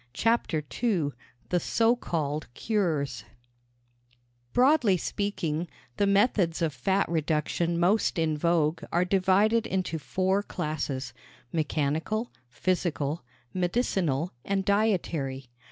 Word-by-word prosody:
CHAPTER 210 - +1 0.2
II 185 -12 +1 0.4
THE 180 - +2
SO 230 +6 +2
CALLED 155 - -3
CURES 155 - -1 1.3
Broadly 250 -6 +4
speaking, 175 -4 -2 0.3
the 200 - +2
methods 195 -5 +2
of 155 -3 0
fat 190 +10 +1
reduction 165 +1 0
most 195 +3 +2
in 160 -2 +1
vogue 165 0 +1
are 175 +2 +2
divided 195 +4 +3
into 185 -4 -1
four 190 +5 0
classes 150 - -3 0.4
mechanical, 160 +8 -1 0.2
physical, 155 +1 -1 0.3
medicinal 180 - 0
and 195 -1 -1
dietary. 165 - 0
175 Hz, 100 wpm, -28 LUFS, 155-200 Hz, 1.3 s, Broadly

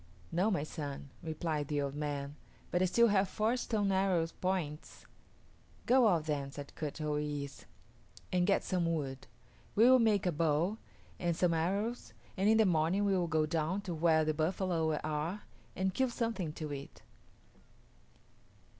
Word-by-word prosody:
"No, 185 +6 +2
my 180 -9 0
son," 145 -3 -6
replied 155 -2 -2
the 145 -1 -1
old 140 -1 -2
man, 145 -1 -4 0.4
"but 175 - +1
I - - +4
still 235 +6 +4
have 195 -2 +2
four 220 +5 +1
stone 215 -5 0
arrow 190 -3 +2
points." 165 -3 -4 0.8
"Go 250 -1 +5
out 170 -6 +2
then," 140 -3 -2
said 145 0 -9
Kut 150 -1 -5
o 150 -1 -1
yis´, 145 -2 -4 0.7
"and 180 0 +2
get 200 - +3
some 175 -2 0
wood. 135 -5 -3 0.5
We 220 - +5
will 260 0 +7
make 215 -4 +3
a 180 - +2
bow 165 +6 +1 0.4
and 170 -1 0
some 175 -2 +2
arrows, 200 +9 -1 0.2
and 195 +2 +2
in 220 - +5
the 220 - +5
morning 175 +3 +2
we 195 -1 +2
will 175 -2 +1
go 160 -1 +2
down 165 +4 -1
to 190 -4 -5
where 160 -1 +3
the 155 - +1
buffalo 160 0 0
are 155 +6 -2 0.3
and 190 0 0
kill 260 +5 +1
something 225 -9 -2
to 155 -2 -5
eat." 140 0 -9
170 Hz, 165 wpm, -33 LUFS, 150-195 Hz, 0.8 s, will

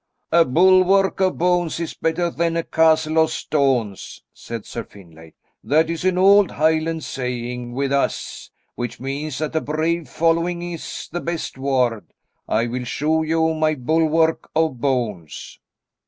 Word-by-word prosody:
"A 170 +1 +6
bulwark 185 +6 +4
of 185 -1 +1
bones 175 -2 +1
is 170 - -4
better 170 +1 -1
than 170 0 -1
a 165 - 0
castle 160 -1 +2
of 160 0 +4
stones," 130 -9 -1
said 115 -2 -8
Sir 115 - -6
Finlay. 80 -6 -16 0.3
"That 160 +3 +2
is 165 0 -4
an 185 -1 +2
old 195 +1 +6
Highland 160 +1 0
saying 125 -1 -4
with 135 +2 -1
us, 140 0 -2 0.2
which 120 -1 -5
means 135 +2 -4
that 155 +1 -3
a 160 - +2
brave 160 +2 -2
following 170 +1 0
is 165 - -7
the 175 - -3
best 170 -1 -4
ward. 130 -5 0 0.4
I 115 +2 +1
will 125 +1 -4
show 155 +6 0
you 160 0 +1
my 155 -1 +1
bulwark 160 +4 +1
of 160 -6 0
bones." 115 - -3
155 Hz, 150 wpm, -21 LUFS, 125-165 Hz, 0.4 s, A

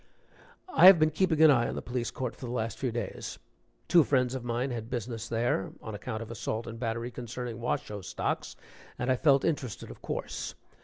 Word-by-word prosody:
(I 180 - +9
have 190 -2 +11
been 155 0 +3
keeping 160 -1 +3
an 155 - +9
eye 120 -4 +3
on - - -4
the - - -3
Police 120 -1 -2
Court 125 -3 -4
for 125 - -7
the - - -4
last 115 -2 -2
few 130 -3 -1
days. 115 -4 -5 0.5
Two 170 -2 +6
friends 130 -3 +2
of 130 -2 -4
mine 120 +2 -1
had 115 -2 -5
business 115 -2 -4
there, 115 -4 0
on 110 - -7
account 110 +2 -4
of 115 - -10
assault 115 0 -3
and 115 0 -7
battery 115 0 -2
concerning 120 -1 -6
Washoe 105 -3 -2
stocks, 100 +2 -3 0.4
and 125 +1 0
I - - +4
felt 140 0 +4
interested, 135 -9 -2
of - - -13
course.) - - -4
120 Hz, 205 wpm, -29 LUFS, 115-130 Hz, 0.5 s, have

